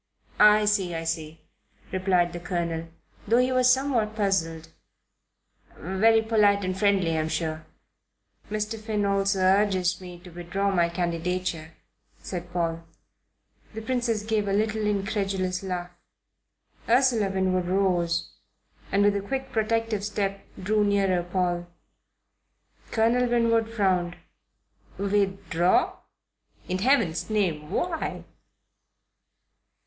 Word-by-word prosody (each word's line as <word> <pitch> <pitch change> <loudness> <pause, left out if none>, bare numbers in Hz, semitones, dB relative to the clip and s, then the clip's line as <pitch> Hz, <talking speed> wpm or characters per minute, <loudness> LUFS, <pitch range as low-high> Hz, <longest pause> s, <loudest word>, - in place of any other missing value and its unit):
"I 210 0 +6
see, 195 -5 +1
I 165 - -3
see," 160 -1 -4 0.5
replied 185 -2 +1
the 175 - -5
Colonel, 170 -1 -3 0.4
though 230 +3 +4
he 250 +1 +3
was 255 0 +4
somewhat 250 -5 +1
puzzled. 165 -6 -1 1.1
"Very 220 +6 +3
polite 205 -3 +3
and 185 0 -2
friendly, 190 -4 +2
I'm 155 0 -1
sure." 160 -1 -3 0.8
"Mr. 215 +1 -3
Finn 215 -1 -1
also 195 0 +1
urges 185 -1 +2
me 180 -1 -9
to 180 - -13
withdraw 175 +4 -2
my 170 -3 +2
candidature," 170 -1 -3 0.4
said 175 -1 -7
Paul. 165 -1 -2 0.9
The 220 - -5
Princess 240 -3 -1
gave 215 -1 0
a 195 - 0
little 215 +1 0
incredulous 195 -2 -1
laugh. 180 -2 -4 1.0
Ursula 240 -4 +3
Winwood 185 -2 0
rose 175 -3 0 0.6
and, 200 +1 +3
with 205 0 +3
a 200 - -1
quick 265 +6 -4
protective 225 -2 0
step, 200 -1 -2 0.2
drew 210 +3 +1
nearer 195 -3 +2
Paul. 175 -1 -1 1.2
Colonel 240 +2 +2
Winwood 230 -1 +2
frowned. 185 -5 0 0.8
"Withdraw? 195 -3 +1 0.7
In 185 0 -2
Heaven's 220 - +1
name 170 -8 -1
why?" 330 - -2
195 Hz, 115 wpm, -26 LUFS, 175-215 Hz, 1.2 s, I